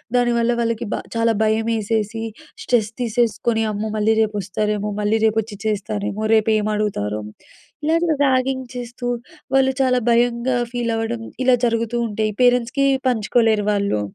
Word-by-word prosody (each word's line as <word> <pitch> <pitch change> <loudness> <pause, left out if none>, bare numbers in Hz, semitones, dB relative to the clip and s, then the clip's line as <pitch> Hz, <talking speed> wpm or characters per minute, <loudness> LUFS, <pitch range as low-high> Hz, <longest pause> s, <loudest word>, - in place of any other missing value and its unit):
దానివల్ల 240 -1 +2
వాళ్ళకి 230 0 -1
బ - - +1 0.2
చాలా 230 0 +2
భయమేసేసి 220 0 0 0.4
స్ట్రెస్ 220 -3 +1
తీసేసుకొని 235 -1 0
అమ్మో! 210 +1 -3
మళ్ళీ 215 +1 +3
రేపొస్తారేమో? 210 0 -1
మళ్ళీ 210 +2 +1
రేపొచ్చి 220 -1 0
చేస్తారేమో? 210 0 -2
రేపేమి 215 -1 +2
అడుగుతారో? 105 - -2 0.6
ఇలాంటి 330 +2 +2
ర్యాగింగ్ 260 0 +1
చేస్తూ 245 0 -6 0.5
వాళ్ళు 265 0 +4
చాలా 255 -1 +3
భయంగా 240 +1 +2 0.2
ఫీలవ్వడం 230 -1 -2 0.2
ఇలా 255 -1 +5
జరుగుతూ 230 0 0
ఉం‌టే 215 0 -1
పేరెంట్స్‌కి 245 +2 +3 0.2
పంచుకోలేరు 225 -2 +2
వాళ్ళు. 200 - 0
225 Hz, 120 wpm, -21 LUFS, 215-245 Hz, 0.6 s, ఇలా